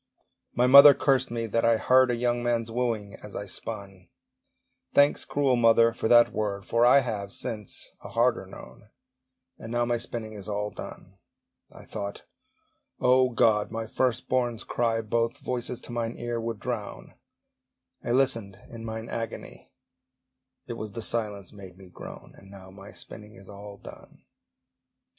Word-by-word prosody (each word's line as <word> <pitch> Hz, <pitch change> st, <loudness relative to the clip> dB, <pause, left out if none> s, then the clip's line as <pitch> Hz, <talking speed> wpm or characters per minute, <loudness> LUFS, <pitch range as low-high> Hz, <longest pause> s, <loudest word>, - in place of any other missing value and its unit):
My 125 Hz, -, +3 dB
mother 140 Hz, +2 st, +10 dB
cursed 135 Hz, -2 st, +2 dB
me 115 Hz, -1 st, -3 dB
that 115 Hz, +1 st, 0 dB
I 115 Hz, -1 st, +4 dB
heard 130 Hz, +3 st, +4 dB
A 120 Hz, -, +1 dB
young 120 Hz, 0 st, 0 dB
man's 115 Hz, -1 st, -1 dB
wooing 115 Hz, -4 st, -2 dB
as -, -, -10 dB
I -, -, -4 dB
spun: 95 Hz, -3 st, -7 dB, 0.9 s
Thanks, 145 Hz, 0 st, +4 dB
cruel 140 Hz, -3 st, +1 dB
mother, 115 Hz, -1 st, +4 dB
for 110 Hz, -, -2 dB
that 120 Hz, 0 st, +6 dB
word, 100 Hz, -2 st, -3 dB
For 120 Hz, +1 st, +3 dB
I 140 Hz, +3 st, +7 dB
have, 105 Hz, -5 st, -4 dB
since, 110 Hz, -4 st, -6 dB
a -, -, -8 dB
harder -, -, +1 dB
known! 65 Hz, +12 st, -13 dB, 0.7 s
And 115 Hz, -, -8 dB
now 120 Hz, 0 st, +1 dB
my 120 Hz, 0 st, 0 dB
spinning 110 Hz, -2 st, -6 dB
is 100 Hz, -2 st, -9 dB
all 105 Hz, 0 st, -3 dB
done. 95 Hz, +1 st, -10 dB, 0.5 s
I -, -, -13 dB
thought, 100 Hz, -2 st, -6 dB, 0.8 s
O 130 Hz, 0 st, +4 dB
God! 115 Hz, -3 st, +2 dB
my 115 Hz, 0 st, -4 dB
first 125 Hz, +2 st, -1 dB
born's 120 Hz, -3 st, -1 dB
cry 115 Hz, -1 st, 0 dB
Both 115 Hz, +3 st, -1 dB
voices 125 Hz, -3 st, -4 dB
to -, -, -10 dB
mine 115 Hz, -1 st, -3 dB
ear 120 Hz, -1 st, -3 dB
would 115 Hz, -2 st, -4 dB
drown: -, -, -6 dB, 0.9 s
I -, -, -5 dB
listened 120 Hz, -6 st, +1 dB
in 115 Hz, -1 st, -8 dB
mine 110 Hz, 0 st, -5 dB
agony, 115 Hz, -1 st, -6 dB, 1.0 s
It 120 Hz, -, -6 dB
was 110 Hz, -3 st, -7 dB
the 115 Hz, -, -4 dB
silence 105 Hz, -5 st, -2 dB
made 95 Hz, -3 st, -12 dB
me 95 Hz, -2 st, -15 dB
groan! -, -, -11 dB
And 95 Hz, -, -16 dB
now 95 Hz, -1 st, -12 dB
my 100 Hz, +1 st, -12 dB
spinning 105 Hz, 0 st, -11 dB
is 95 Hz, -4 st, -14 dB
all 100 Hz, 0 st, -10 dB
done. -, -, -14 dB
115 Hz, 160 wpm, -27 LUFS, 105-120 Hz, 1.0 s, mother